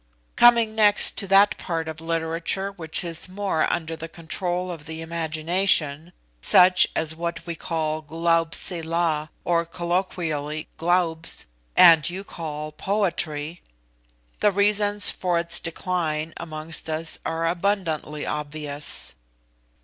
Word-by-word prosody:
Coming 235 -2 +5
next 210 -2 +5
to 200 - -1
that 195 +2 +4
part 165 -2 -3
of 160 0 -7
literature 165 +4 -2
which 165 -4 -2
is 170 +1 0
more 195 -3 -1
under 165 -1 -3
the 165 +1 -7
control 175 +2 -4
of 165 -3 -9
the 160 0 -6
imagination, 165 -1 0 0.3
such 180 +1 +6
as 160 0 +2
what 170 0 -5
we 170 - -4
call 155 -1 -3
Glaubsila, 165 0 -1
or 170 -1 +1
colloquially 170 -3 -3
'Glaubs,' 170 -1 0 0.3
and 165 -2 +7
you 185 +3 -6
call 155 -4 -6
poetry, 170 -4 -3 0.8
the 210 - +3
reasons 205 +1 +4
for 180 -2 -1
its 170 0 +1
decline 165 -2 -3
amongst 160 -1 -5
us 160 +1 -1
are 165 0 -2
abundantly 170 -5 -2
obvious. 150 - -1
165 Hz, 120 wpm, -24 LUFS, 160-180 Hz, 0.8 s, and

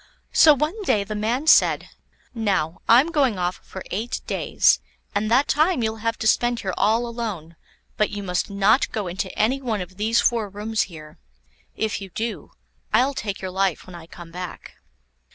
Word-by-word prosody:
So 305 -2 +7
one 310 - -2
day 215 - +1
the 215 +2 -6
man 225 +7 -1
said: 320 - +4 0.4
"Now, 190 -8 -1
I'm 255 +8 +6
going 270 - +2
off 180 0 -1
for 190 - -9
eight 230 +6 -3
days, - - +2 0.3
and 210 +1 0
that 255 +5 +3
time 310 -3 +2
you'll 220 0 -1
have 230 +1 -2
to 220 - -5
spend 240 +1 +2
here 190 -2 -3
all 225 +3 +2
alone; 215 -9 -5 0.4
but 215 - +2
you 205 -1 -6
must 180 0 -1
not 200 +5 +2
go 215 -3 -3
into 185 +1 -4
any 255 +6 +1
one 230 -5 -2
of 185 0 -8
these 220 +3 +2
four 230 -4 +1
rooms 210 +2 -2
here. 155 -1 -12 0.6
If 215 -2 -2
you 195 - -8
do, 225 +5 -5 0.4
I'll 255 +6 +3
take 205 -6 -4
your 185 - -3
life 190 -2 0
when 185 - -12
I 170 -2 -11
come 170 -1 -12
back." 180 0 -8
215 Hz, 185 wpm, -23 LUFS, 190-240 Hz, 0.6 s, So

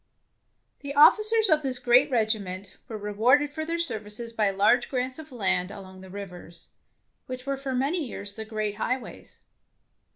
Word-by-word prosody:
The 280 0 -7
officers 430 +9 +6
of 310 -4 +3
this 265 -3 -1
great 245 +3 +4
regiment 205 -6 -2
were 220 - -6
rewarded 240 +8 +2
for 315 - -4
their 335 +2 -2
services 230 -7 -1
by 215 -3 +1
large 200 +5 +2
grants 255 +1 -3
of 315 -2 -11
land 190 -6 0
along 190 -2 -11
the 190 - -12
rivers, 180 -3 -10 0.6
which 255 0 -7
were 275 0 -1
for 270 -1 -4
many 290 +7 0
years 200 -6 -6
the 220 - -5
great 215 -1 -4
highways. 255 +3 -5
240 Hz, 160 wpm, -26 LUFS, 205-280 Hz, 0.6 s, officers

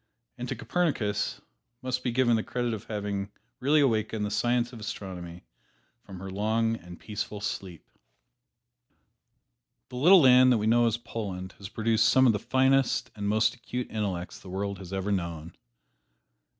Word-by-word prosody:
And 125 0 -4
to - - -2
Copernicus 110 - -1 0.4
must 125 0 -2
be - - 0
given 120 -1 +3
the 110 - +1
credit 120 0 -2
of 110 0 -6
having 100 -1 -3 0.3
really 145 +4 +3
awakened 110 -4 +1
the 105 - -3
science 120 +2 +1
of 115 - -9
astronomy 90 -5 -7 0.6
from 95 -2 -11
her 95 +1 -7
long 110 +3 +1
and 90 -4 -11
peaceful 105 -1 -5
sleep. 95 -4 -5 2.0
The 125 - -7
little 180 +9 +7
land 130 -1 +7
that 120 - +4
we 105 - -1
know 120 +1 +4
as 115 0 0
Poland 95 -6 -6
has 100 -1 -8
produced 110 0 +2
some 130 0 +5
of 120 - +5
the 105 - -1
finest 130 +2 +2
and 100 -1 -2
most 110 +1 +3
acute 125 0 -6
intellects 95 -5 -3
the 95 - -12
world 100 +1 -3
has 95 -2 -10
ever 95 +1 -2
known. 85 -4 -3
110 Hz, 165 wpm, -28 LUFS, 100-120 Hz, 2.0 s, little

